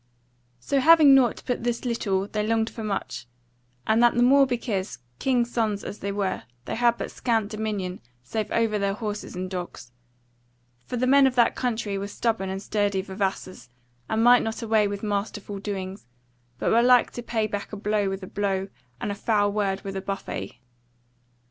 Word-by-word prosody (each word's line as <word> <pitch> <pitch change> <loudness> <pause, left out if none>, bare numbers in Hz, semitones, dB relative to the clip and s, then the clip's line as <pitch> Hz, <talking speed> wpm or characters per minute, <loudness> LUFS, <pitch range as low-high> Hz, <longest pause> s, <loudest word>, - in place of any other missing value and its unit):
So 275 - 0
having 310 0 +7
nought 255 -4 +3
but 245 -2 -2
this 240 +1 -2
little 200 -5 -1
they 210 0 -2
longed 225 +1 0
for 225 - -7
much; 200 -10 -4 0.6
and 220 +1 +3
that 240 0 +5
the 240 - +4
more 275 +2 +6
because, 215 - -2 0.2
king's 245 -3 +1
sons 215 -4 0
as 205 - -7
they 200 - -3
were, 195 -2 -2 0.2
they - - -4
had 235 0 +2
but - - -5
scant 225 -4 -1
dominion 210 -4 -3 0.2
save 215 - -3
over 225 -2 +1
their 200 0 0
horses 210 -3 -5
and 185 +1 -3
dogs: 180 -9 -7 1.0
for 245 - -3
the 250 - +1
men 275 +1 +6
of 255 - -1
that 240 -2 +4
country 220 -5 -2
were 200 - -4
stubborn 210 -2 -1
and 190 +1 -4
sturdy 205 -2 0
vavassors, 190 -6 -4 0.4
and 220 +1 +1
might 245 +1 +7
not 225 +1 -4
away 220 -2 +3
with 200 +1 -5
masterful 205 -1 -3
doings, 195 - -5 0.5
but - - 0
were 230 - +5
like 245 0 +5
to 240 - -6
pay 225 -2 -1
back 205 -1 -5
a 210 - -5
blow 205 -1 0
with 195 0 -5
a - - -6
blow, 195 -1 -2 0.3
and 205 - -3
a - - -1
foul 205 0 +1
word 200 -2 -1
with 195 0 -5
a 190 - -3
buffet. 195 0 -5
210 Hz, 185 wpm, -25 LUFS, 195-235 Hz, 1.0 s, having